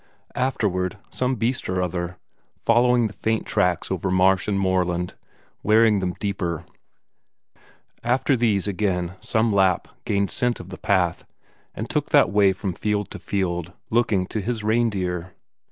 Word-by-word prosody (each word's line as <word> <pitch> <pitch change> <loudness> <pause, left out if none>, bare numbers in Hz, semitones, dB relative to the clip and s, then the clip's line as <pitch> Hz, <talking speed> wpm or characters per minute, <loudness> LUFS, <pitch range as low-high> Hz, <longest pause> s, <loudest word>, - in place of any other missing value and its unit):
Afterward, 105 -7 -1
some 130 +1 0
beast 120 0 -1
or 95 0 0
other, 90 0 -2 0.4
following 120 +1 +3
the 105 - -3
faint 110 +1 -1
tracks 90 -1 0
over 95 +1 -1
marsh 95 +1 +3
and 100 -2 +1
moorland, 90 -2 0 0.5
wearing 110 -1 +4
them 90 -1 -1
deeper; 90 -5 -2 1.4
after 130 +3 +2
these 110 -5 +1
again 95 -3 -1
some 110 -1 +1
Lapp 95 -2 +3 0.2
gained 100 -1 0
scent 125 -1 0
of 90 - -10
the 90 - -9
path, 90 -3 +1 0.5
and - - -4
took - - -1
that - - +5
way 100 -1 +5
from 95 0 -3
field 105 +1 -2
to - - -7
field, 90 -3 -2 0.2
looking 110 -5 +2
to 105 +3 -3
his 115 +1 -3
reindeer. 95 -6 0
100 Hz, 145 wpm, -23 LUFS, 90-110 Hz, 1.4 s, that